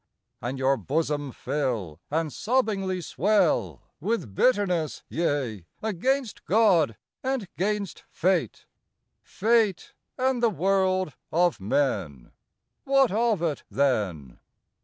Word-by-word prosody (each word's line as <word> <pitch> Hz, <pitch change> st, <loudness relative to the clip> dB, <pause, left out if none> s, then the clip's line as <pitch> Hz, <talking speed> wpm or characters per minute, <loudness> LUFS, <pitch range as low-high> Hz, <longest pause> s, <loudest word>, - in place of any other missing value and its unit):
And 125 Hz, +3 st, -3 dB
your 135 Hz, +1 st, +2 dB
bosom 145 Hz, -1 st, -1 dB
fill, 125 Hz, -, -3 dB
And 155 Hz, 0 st, -1 dB
sobbingly 205 Hz, -6 st, 0 dB
swell, 195 Hz, +1 st, +1 dB, 0.2 s
With 185 Hz, -, -2 dB
bitterness, 180 Hz, -, +1 dB
yea, 135 Hz, -, -1 dB
against 230 Hz, +4 st, -1 dB
God 180 Hz, -, +3 dB, 0.3 s
and 260 Hz, -6 st, -1 dB
'gainst 200 Hz, 0 st, -2 dB
Fate, 175 Hz, -, 0 dB, 0.6 s
Fate, 220 Hz, -3 st, +1 dB, 0.2 s
and 260 Hz, -1 st, +1 dB
the 235 Hz, -, +4 dB
world 185 Hz, -2 st, +1 dB, 0.2 s
of 175 Hz, 0 st, +2 dB
men, 95 Hz, -, -1 dB, 0.5 s
What 275 Hz, -3 st, +3 dB
of 220 Hz, -4 st, +1 dB
it 155 Hz, -4 st, -1 dB
then?... 100 Hz, -, -1 dB
175 Hz, 100 wpm, -26 LUFS, 135-215 Hz, 0.6 s, the